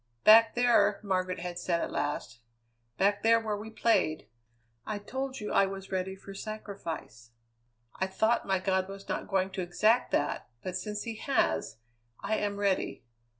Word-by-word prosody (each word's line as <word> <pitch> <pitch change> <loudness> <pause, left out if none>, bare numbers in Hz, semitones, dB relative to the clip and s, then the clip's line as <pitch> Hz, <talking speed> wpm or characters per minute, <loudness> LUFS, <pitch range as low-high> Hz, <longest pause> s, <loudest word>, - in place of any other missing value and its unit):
"Back 225 +1 +8
there," 230 -4 +4
Margaret 185 -3 -1
had 175 0 -4
said 175 -1 0
at - - -3
last, 125 -1 -3 0.6
"back 200 +1 +2
there 230 +1 +5
where 220 -2 -2
we 210 +2 -7
played, 220 - +1 0.6
I 215 - -3
told 265 +6 -4
you 210 - -4
I 195 - +5
was 195 0 -7
ready 190 0 -2
for 195 +1 -11
sacrifice. 195 - -7 0.7
I 190 - 0
thought 220 +5 +1
my 190 -1 +2
God 190 0 0
was 195 0 -9
not - - -3
going 190 -1 0
to 190 0 -3
exact 215 +7 +2
that, - - -1
but 185 -1 -4
since 210 +3 -3
he 225 -2 -5
has, 110 - 0 0.4
I 220 - -1
am 205 -1 -2
ready. 200 - 0
195 Hz, 165 wpm, -30 LUFS, 185-215 Hz, 0.7 s, Back